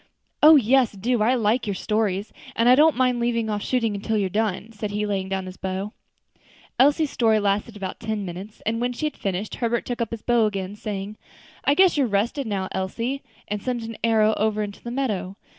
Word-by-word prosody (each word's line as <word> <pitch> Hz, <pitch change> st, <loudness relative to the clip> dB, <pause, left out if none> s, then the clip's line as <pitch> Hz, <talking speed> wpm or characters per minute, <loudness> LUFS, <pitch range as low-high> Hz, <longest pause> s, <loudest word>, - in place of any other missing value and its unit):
"Oh! 310 Hz, +1 st, +9 dB
yes, 255 Hz, -2 st, +4 dB
do; 225 Hz, +4 st, 0 dB
I 240 Hz, +4 st, +3 dB
like 230 Hz, 0 st, +1 dB
your 200 Hz, -, -1 dB
stories, 210 Hz, 0 st, -1 dB, 0.2 s
and 230 Hz, -, +2 dB
I 250 Hz, -, +8 dB
don't 300 Hz, +1 st, +5 dB
mind 250 Hz, -1 st, +2 dB
leaving 230 Hz, -2 st, 0 dB
off 205 Hz, -1 st, -2 dB
shooting 225 Hz, -5 st, -1 dB
till 220 Hz, +1 st, 0 dB
you're 195 Hz, -3 st, 0 dB
done," 215 Hz, +1 st, -1 dB
said 210 Hz, -1 st, -5 dB
he, 210 Hz, +1 st, -2 dB
laying 195 Hz, -2 st, -2 dB
down 190 Hz, -1 st, -2 dB
his 185 Hz, 0 st, -9 dB
bow. 190 Hz, +2 st, -4 dB, 0.9 s
Elsie's 290 Hz, +2 st, +4 dB
story 220 Hz, -3 st, +3 dB
lasted 205 Hz, +2 st, -1 dB
about 190 Hz, -2 st, -5 dB
ten 215 Hz, -2 st, -3 dB
minutes, 190 Hz, +4 st, -8 dB
and 230 Hz, +2 st, -1 dB
when 245 Hz, 0 st, 0 dB
she 305 Hz, -, -3 dB
had 300 Hz, -, -2 dB
finished, 195 Hz, +1 st, -3 dB
Herbert 235 Hz, -1 st, -1 dB
took 240 Hz, -1 st, -3 dB
up 230 Hz, -, -1 dB
his 230 Hz, -2 st, -7 dB
bow 235 Hz, -3 st, +3 dB
again, 195 Hz, -1 st, -4 dB
saying, 210 Hz, 0 st, -5 dB, 0.5 s
"I 285 Hz, -, +4 dB
guess 375 Hz, -1 st, +5 dB
you're 275 Hz, -3 st, +3 dB
rested 225 Hz, +6 st, 0 dB
now, 195 Hz, -3 st, -2 dB
Elsie," 230 Hz, +8 st, -3 dB, 0.3 s
and 210 Hz, 0 st, -3 dB
sent 245 Hz, -1 st, -2 dB
an 225 Hz, 0 st, -6 dB
arrow 220 Hz, -1 st, +4 dB
over 215 Hz, 0 st, +1 dB
into 200 Hz, -1 st, -8 dB
the 235 Hz, -, -5 dB
meadow. 215 Hz, -7 st, -2 dB
220 Hz, 210 wpm, -24 LUFS, 200-240 Hz, 0.9 s, Oh